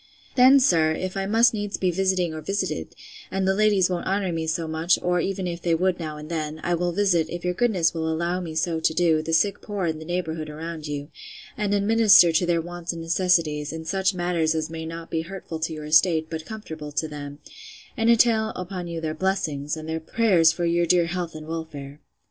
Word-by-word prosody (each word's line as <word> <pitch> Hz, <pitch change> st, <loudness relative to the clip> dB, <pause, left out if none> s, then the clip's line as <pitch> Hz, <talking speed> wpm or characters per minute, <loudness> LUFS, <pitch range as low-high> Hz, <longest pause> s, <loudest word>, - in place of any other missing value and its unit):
Then, 260 Hz, +2 st, +7 dB
sir, 165 Hz, -11 st, +3 dB
if 185 Hz, +3 st, -4 dB
I 195 Hz, 0 st, -2 dB
must 230 Hz, +3 st, +4 dB
needs 205 Hz, -1 st, -3 dB
be 185 Hz, -1 st, +1 dB
visiting 185 Hz, -2 st, 0 dB
or 155 Hz, -, -6 dB
visited, 185 Hz, -, -3 dB, 0.3 s
and 190 Hz, 0 st, -1 dB
the 190 Hz, -, +3 dB
ladies 205 Hz, -2 st, +3 dB
won't 180 Hz, -2 st, -3 dB
honour 195 Hz, -1 st, 0 dB
me 165 Hz, -1 st, -3 dB
so 165 Hz, 0 st, -1 dB
much, 160 Hz, +2 st, +1 dB
or 180 Hz, 0 st, 0 dB
even 190 Hz, +2 st, -2 dB
if 170 Hz, -1 st, -4 dB
they 170 Hz, -1 st, +1 dB
would 180 Hz, +2 st, 0 dB
now 155 Hz, -2 st, -5 dB
and 150 Hz, 0 st, -9 dB
then, 155 Hz, -1 st, -4 dB
I 175 Hz, -, 0 dB
will 175 Hz, +1 st, 0 dB
visit, 175 Hz, -3 st, +1 dB
if 175 Hz, 0 st, -6 dB
your 180 Hz, -, +1 dB
goodness 190 Hz, -6 st, +1 dB
will 160 Hz, -1 st, -2 dB
allow 170 Hz, +3 st, -1 dB
me 165 Hz, -3 st, -6 dB
so 160 Hz, 0 st, 0 dB
to 160 Hz, -, +1 dB
do, 165 Hz, -3 st, +3 dB
the 160 Hz, +1 st, -5 dB
sick 195 Hz, +5 st, +2 dB
poor 205 Hz, -3 st, -3 dB
in 160 Hz, -2 st, -2 dB
the 160 Hz, -, -9 dB
neighbourhood 160 Hz, -3 st, -3 dB
around 160 Hz, 0 st, -6 dB
you; 145 Hz, 0 st, -5 dB, 0.5 s
and 210 Hz, -2 st, -1 dB
administer 200 Hz, -4 st, +6 dB
to 160 Hz, +2 st, +2 dB
their 170 Hz, -1 st, +2 dB
wants 175 Hz, 0 st, -5 dB
and 170 Hz, -1 st, -7 dB
necessities, 165 Hz, -4 st, +1 dB
in 160 Hz, 0 st, -7 dB
such 190 Hz, +2 st, 0 dB
matters 170 Hz, -3 st, 0 dB
as 160 Hz, 0 st, -2 dB
may 160 Hz, 0 st, -5 dB
not 165 Hz, 0 st, -8 dB
be 160 Hz, -, 0 dB
hurtful 170 Hz, -2 st, -7 dB
to 160 Hz, +1 st, -2 dB
your 155 Hz, -1 st, -7 dB
estate, 160 Hz, +1 st, +3 dB
but 160 Hz, -1 st, -5 dB
comfortable 160 Hz, -9 st, -7 dB
to 160 Hz, -, -1 dB
them; 145 Hz, -1 st, -8 dB, 0.6 s
and 230 Hz, -3 st, +1 dB
entail 225 Hz, -1 st, +4 dB
upon 180 Hz, -1 st, -5 dB
you 165 Hz, -1 st, -5 dB
their 155 Hz, -1 st, -2 dB
blessings, 155 Hz, -4 st, -2 dB
and 155 Hz, 0 st, -8 dB
their 160 Hz, 0 st, -2 dB
prayers 170 Hz, -2 st, +3 dB
for 170 Hz, +1 st, -3 dB
your 170 Hz, 0 st, +1 dB
dear 175 Hz, 0 st, +4 dB
health 170 Hz, -1 st, -4 dB
and 155 Hz, 0 st, -8 dB
welfare. 150 Hz, -3 st, -7 dB
170 Hz, 225 wpm, -24 LUFS, 160-190 Hz, 0.6 s, Then